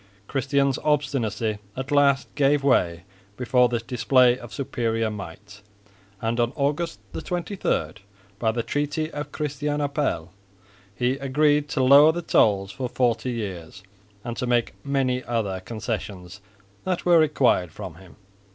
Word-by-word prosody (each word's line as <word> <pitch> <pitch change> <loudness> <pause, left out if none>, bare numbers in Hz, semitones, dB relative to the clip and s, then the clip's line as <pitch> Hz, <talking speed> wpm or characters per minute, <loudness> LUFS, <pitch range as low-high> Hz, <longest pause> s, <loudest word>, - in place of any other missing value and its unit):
Christian's 140 0 +1
obstinacy 120 -8 0 0.2
at 130 +2 -5
last 140 -1 +3
gave 145 0 +2
way 85 -11 +2 0.3
before 125 0 +3
this 115 -1 -2
display 125 +1 +3
of 120 -2 -11
superior 115 -5 -1
might, 100 +1 -9 0.6
and 115 +1 -1
on 120 +2 +1
August 150 +4 -1
23, 175 - -3 0.4
by 110 -1 +2
the 115 +1 -2
treaty 150 +4 -2
of 145 0 -6
Christianopel 145 - -2 0.7
he 125 +5 0
agreed 145 +2 +2
to 135 - 0
lower 140 +4 +8
the 170 +1 -5
tolls 100 -9 +3
for 125 +5 -4
forty 120 -1 0
years 95 -6 -6 0.4
and 120 -1 -5
to 125 - -2
make 120 -1 +1
many 130 -2 0
other 110 -6 -2
concessions 105 -2 -6 0.4
that 185 -2 -2
were 175 -2 +6
required 130 - +2
from 85 +1 -8
him. 90 +2 -16
125 Hz, 135 wpm, -24 LUFS, 110-145 Hz, 0.7 s, lower